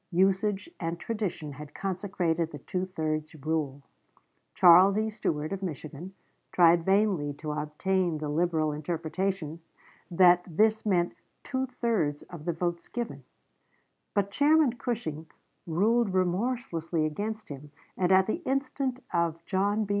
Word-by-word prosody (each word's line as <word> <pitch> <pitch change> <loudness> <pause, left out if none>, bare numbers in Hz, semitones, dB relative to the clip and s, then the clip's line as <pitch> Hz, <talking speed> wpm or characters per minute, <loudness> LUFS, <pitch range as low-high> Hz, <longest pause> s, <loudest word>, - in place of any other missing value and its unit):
Usage 195 - +2
and 170 0 -3
tradition 190 -9 -3
had 145 +1 -10
consecrated 180 -4 -1
the 150 - -8
two 180 +6 -3
thirds 155 -3 -3
rule. 150 -2 -2 0.7
Charles 185 +3 +7
E. 220 0 0
Stuart, 155 -5 -2
of 195 - -4
Michigan, 165 +1 -6 0.4
tried 170 -1 +5
vainly 190 -6 +2
to 150 +1 -5
obtain 155 +4 -1
the 150 0 -4
liberal 160 0 +1
interpretation, 165 +2 -3 0.5
that 175 0 +5
this 215 +6 +2
meant 175 -3 +2 0.3
"two 260 0 -2
thirds 215 - -1
of 170 -4 -11
the 175 - +1
votes 170 +1 -3
given," 240 -1 -5 0.9
but 200 -1 +1
Chairman 295 +1 +4
Cushing 165 -11 -4 0.4
ruled 205 +5 +2
remorselessly 180 -4 0
against 210 +8 -4
him, 145 +1 -8 0.3
and 180 0 +1
at 190 0 +6
the 330 - -2
instance 265 -1 -1
of 170 -1 0
John 205 +2 +1
B. - - -13
180 Hz, 130 wpm, -28 LUFS, 155-205 Hz, 0.9 s, Charles